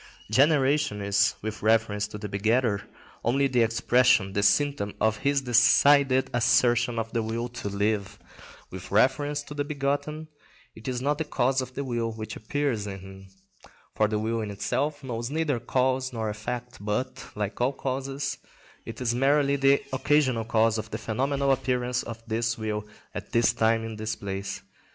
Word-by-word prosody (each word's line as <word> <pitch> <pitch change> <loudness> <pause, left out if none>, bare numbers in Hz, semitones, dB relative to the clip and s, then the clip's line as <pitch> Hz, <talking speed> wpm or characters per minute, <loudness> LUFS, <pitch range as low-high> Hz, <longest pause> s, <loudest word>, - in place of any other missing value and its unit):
Generation 140 -2 +3
is, 100 0 +2
with 110 0 -5
reference 110 -1 +2
to 105 - -8
the 105 0 -5
begetter, 110 +1 +1 0.4
only 135 +4 +2
the 125 -3 +2
expression, 115 -3 +3
the 100 - +1
symptom, 105 -2 +2
of 110 -1 +2
his 140 +5 +1
decided 130 +2 +5
assertion 120 0 +3
of 115 0 -3
the 115 - +1
will 115 +2 -3
to 120 -4 -6
live: 100 -1 -1 0.5
with 95 0 -8
reference 145 +7 +2
to 150 - -9
the 145 0 -1
begotten, 145 +2 -2 0.5
it 110 - -12
is 125 -1 -2
not 145 +2 0
the - - +1
cause 135 -2 +1
of 130 0 -8
the 140 - -2
will 120 -3 -2
which 110 -1 -7
appears 115 -2 -2
in 95 -1 -6
him, 95 0 -12 0.7
for 110 - +2
the 105 0 -1
will 110 +2 -1
in 105 - -4
itself 145 +8 -2
knows 120 -2 -4
neither 150 -4 0
cause 130 +2 0
nor 110 -3 -3
effect, 120 +2 -6
but, 110 +5 -2
like 105 +2 -3
all 125 +2 +3
causes, 135 0 -3 0.5
it - - -7
is 120 -2 +1
merely 140 +2 +3
the 135 0 +3
occasional 130 -4 +2
cause 110 0 +2
of 110 +1 -6
the - - -4
phenomenal 135 +4 0
appearance 125 -2 0
of 115 -1 -8
this 115 0 -1
will 105 -1 -3 0.3
at - - -7
this 115 0 +3
time 115 -1 +2
in 110 -1 -6
this 110 0 -3
place. 100 -1 -5
120 Hz, 170 wpm, -26 LUFS, 110-135 Hz, 0.7 s, decided